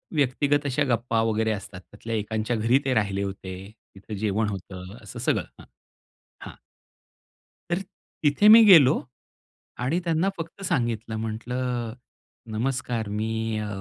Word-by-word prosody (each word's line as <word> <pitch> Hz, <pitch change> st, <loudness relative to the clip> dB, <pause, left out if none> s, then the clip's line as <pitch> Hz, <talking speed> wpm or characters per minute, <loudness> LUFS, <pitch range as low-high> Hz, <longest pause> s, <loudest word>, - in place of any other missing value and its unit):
व्यक्तिगत 145 Hz, +1 st, +1 dB
अशा 145 Hz, +1 st, +1 dB
गप्पा 115 Hz, -1 st, 0 dB
वगैरे 110 Hz, 0 st, +1 dB
असतात. 100 Hz, -2 st, -6 dB
त्यातल्या 110 Hz, +4 st, -7 dB
एकांच्या 110 Hz, +2 st, -2 dB
घरी 115 Hz, +5 st, +3 dB
ते 135 Hz, -, +1 dB
राहिले 100 Hz, -4 st, 0 dB
होते. 95 Hz, -1 st, -6 dB, 0.4 s
तिथं 100 Hz, +2 st, -8 dB
जेवण 105 Hz, +1 st, 0 dB
होतं. 95 Hz, -1 st, -8 dB
असं -, -, -9 dB
सगळं -, -, 0 dB
हां. -, -, -13 dB, 0.8 s
हां. -, -, -9 dB, 1.2 s
तर 175 Hz, +2 st, 0 dB, 0.4 s
तिथे 150 Hz, +8 st, +4 dB
मी 225 Hz, +1 st, +10 dB
गेलो 155 Hz, -9 st, +8 dB, 0.9 s
आणि 155 Hz, +8 st, +1 dB
त्यांना 165 Hz, +3 st, +1 dB
फक्त 165 Hz, +3 st, -7 dB
सांगितलं 115 Hz, -, -1 dB
म्हंटलं, 120 Hz, +2 st, -3 dB, 0.6 s
"नमस्कार 120 Hz, -1 st, -2 dB
मी 110 Hz, 0 st, -2 dB
अ" 105 Hz, -, -3 dB
115 Hz, 130 wpm, -25 LUFS, 110-135 Hz, 1.2 s, मी